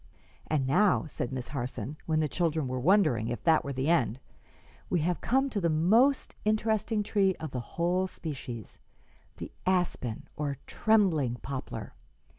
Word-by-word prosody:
"And 150 -4 +1
now," 180 +10 +3
said 135 -4 -4
Miss 130 -2 -5
Harson, 130 0 -4
when 155 -1 +2
the 155 - +1
children 160 -3 0
were 130 0 -2
wondering 135 - +3
if 120 0 -4
that 160 -2 +4
were 140 - -4
the 135 +1 -2
end, 130 -8 +2 0.7
"we 175 - +1
have 175 0 0
come 270 +2 +2
to 205 - -1
the 170 - +2
most 220 - +3
interesting 215 0 +1
tree 195 -3 +2
of 155 -3 -6
the 125 - -3
whole 175 +9 0
species 130 - -7 0.6
the - - -7 0.2
aspen, 175 -11 0
or 145 -2 -2
trembling 180 - +2
poplar. 135 -1 -5
160 Hz, 155 wpm, -29 LUFS, 130-190 Hz, 0.7 s, that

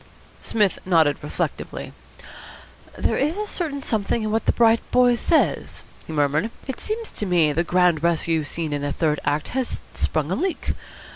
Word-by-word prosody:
Psmith 210 -4 +1
nodded 160 -6 +3
reflectively. 150 - -4 1.0
"There - - +1
is 300 +7 0
certainly 295 -8 -3
something 220 +1 0
in 215 - -1
what 225 +1 0
the - - +6
bright 230 -1 +4
boy 250 -1 +5
says," 310 +7 +1 0.2
he - - -6
murmured. 150 +6 +1 0.2
"It 265 - -5
seems 445 +1 -4
to 210 - -4
me 165 -4 +3
the 165 +4 +1
grand 175 -2 +3
rescue 165 -1 +1
scene 155 +1 -4
in 145 - -2
the 145 0 -2
third 150 -1 +1
act 145 +1 0
has 260 -1 -2
sprung 155 +1 -1
a - - +2
leak. 360 - -1
180 Hz, 165 wpm, -23 LUFS, 155-240 Hz, 1.0 s, the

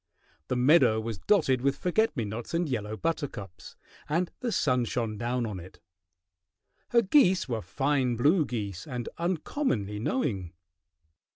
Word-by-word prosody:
The - - -1
meadow 125 -3 +5
was 110 -3 -4
dotted 135 - +2
with 140 +1 +1
forget 180 0 +1
me 115 - 0
nots 110 +8 -5
and 170 0 +1
yellow 110 -5 -3
buttercups, 135 - -4 0.3
and 170 +4 0
the 245 - -2
sun 125 - +2
shone 115 -2 -2
down 120 +2 -1
on 105 -4 -5
it; 90 +2 -13 1.1
her 235 -1 +4
geese 190 - +4
were 115 -3 -2
fine 130 - 0
blue 150 +9 +4
geese 105 - -5
and 125 -4 -4
uncommonly 165 - -1
knowing. 105 - -2
125 Hz, 145 wpm, -28 LUFS, 110-165 Hz, 1.1 s, meadow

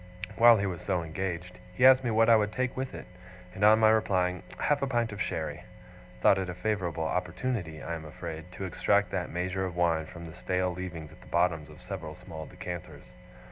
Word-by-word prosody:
While 120 0 +8
he 100 - 0
was 90 -4 -3
so 90 -4 -1
engaged, 90 +2 -4 0.2
he 125 - +4
asked 130 0 +8
me 120 - 0
what 115 0 +4
I 115 - +8
would 105 -1 +2
take 130 +2 -1
with 130 0 -4
it; - - -8 0.5
and 95 - -4
on 105 +1 +8
my 110 -1 +5
replying 90 -5 +1 0.2
'Half 145 -1 +1
a 140 - +1
pint 120 -3 0
of 100 - -6
sherry,' - - -3 0.6
thought 95 - +5
it 95 -1 -3
a 90 - -5
favourable 90 -4 -1
opportunity, 90 0 -2
I 85 - -4
am 80 -1 -6
afraid, 80 +2 -7
to 95 - -5
extract 90 - +1
that - - -2
measure 90 +2 -2
of 90 -2 -4
wine 85 -2 +1
from 85 -1 -9
the 80 - -9
stale 90 -1 -1
leavings 85 -4 -6
at - - -17
the - - -16
bottoms 85 -4 +1
of - - -14
several - - -6
small 80 -1 -9
decanters. 85 -8 -8
90 Hz, 215 wpm, -29 LUFS, 85-110 Hz, 0.6 s, While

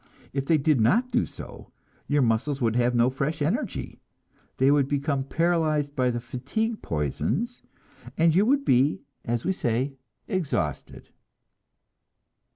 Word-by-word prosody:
If 135 0 -2
they 160 - +4
did 145 -3 +2
not 235 - +3
do 245 0 +1
so, - - -11 0.4
your 145 -1 +2
muscles 125 +5 0
would 115 -3 +1
have 125 0 +2
no 120 +2 +4
fresh 140 +4 -2
energy; 160 - -2 0.6
they 135 +2 +4
would 145 -2 +3
become 140 -1 0
paralyzed 155 -2 0
by 125 -1 +2
the 120 -1 -1
fatigue 140 - -3
poisons, 85 - -2 0.6
and 165 0 +4
you 190 +5 +4
would 280 +2 +2
be, 130 +5 +3 0.2
as 120 0 -2
we 190 - +2
say, 130 -4 -1 0.3
exhausted. 155 - -3
140 Hz, 140 wpm, -26 LUFS, 125-165 Hz, 0.6 s, they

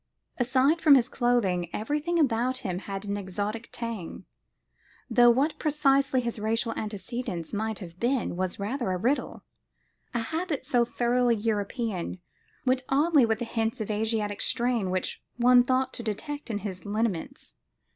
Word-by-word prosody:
Aside 260 +6 +3
from 295 -3 +8
his 250 -2 +4
clothing, 215 -10 +1
everything 300 +10 -1
about 255 -3 +2
him 180 -1 -2
had 195 0 -6
an 200 0 -2
exotic 205 +4 -4
tang, 230 -7 -6 0.9
though 240 +1 +7
what 275 +6 +2
precisely 275 -3 +2
his 235 -2 -3
racial 225 +2 0
antecedents 210 -4 -4
might 220 0 -2
have 175 -3 -10
been 245 -5 0
was 185 0 -2
rather 230 +3 -2
a 185 - 0
riddle; 250 +10 -1 0.7
a 235 - +1
habit 315 +1 -3
so 245 -3 +3
thoroughly 240 0 +2
European 210 -3 -2 0.5
went 255 0 +2
oddly 290 -2 +4
with 225 -1 +1
the 240 - -3
hints 225 +1 -1
of 215 -1 -3
Asiatic 210 -1 -1
strain 235 -5 +1
which 185 0 -2 0.2
one 245 0 +6
thought 260 +1 +1
to - - -6
detect 265 +7 -5
in 215 - -1
his 190 -3 -5
lineaments. 215 - -3
235 Hz, 150 wpm, -27 LUFS, 205-260 Hz, 0.9 s, from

